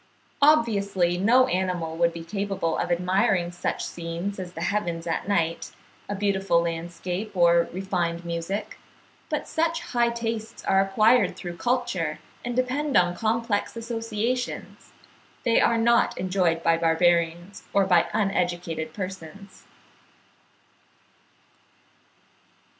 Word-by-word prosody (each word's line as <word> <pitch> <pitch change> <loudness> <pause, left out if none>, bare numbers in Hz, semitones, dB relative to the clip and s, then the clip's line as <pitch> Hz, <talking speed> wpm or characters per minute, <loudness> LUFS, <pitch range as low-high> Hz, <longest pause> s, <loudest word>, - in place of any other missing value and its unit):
Obviously 200 - +3
no 245 +6 +5
animal 180 -7 -2
would 170 0 +2
be 165 0 -8
capable 195 -2 -2
of - - -1
admiring 180 0 +1
such 175 - -3
scenes 170 +4 -5
as 180 -1 -6
the 165 - -7
heavens 175 -3 -1
at 165 +2 -2
night, 165 -5 -1 0.4
a 205 - -2
beautiful 195 -3 +1
landscape, 175 +4 -4
or 170 -1 +4
refined 175 -2 -2
music; 170 +4 -4 0.5
but - - -2
such 330 +1 0
high 240 -1 +3
tastes 230 -1 -4
are 190 - +4
acquired 215 +5 +3
through 175 -2 -6
culture, 195 -9 -1 0.3
and 245 0 -3
depend 260 +3 +1
on 175 -1 +3
complex 225 +1 -1
associations; 230 +1 -3 0.5
they 235 -2 +3
are 235 - +3
not 235 +1 +3
enjoyed 180 -2 0
by 165 0 +3
barbarians 170 +2 +1
or 200 -1 +3
by 180 -3 +4
uneducated 175 -5 -1
persons. 190 0 -8
190 Hz, 115 wpm, -25 LUFS, 170-220 Hz, 0.5 s, no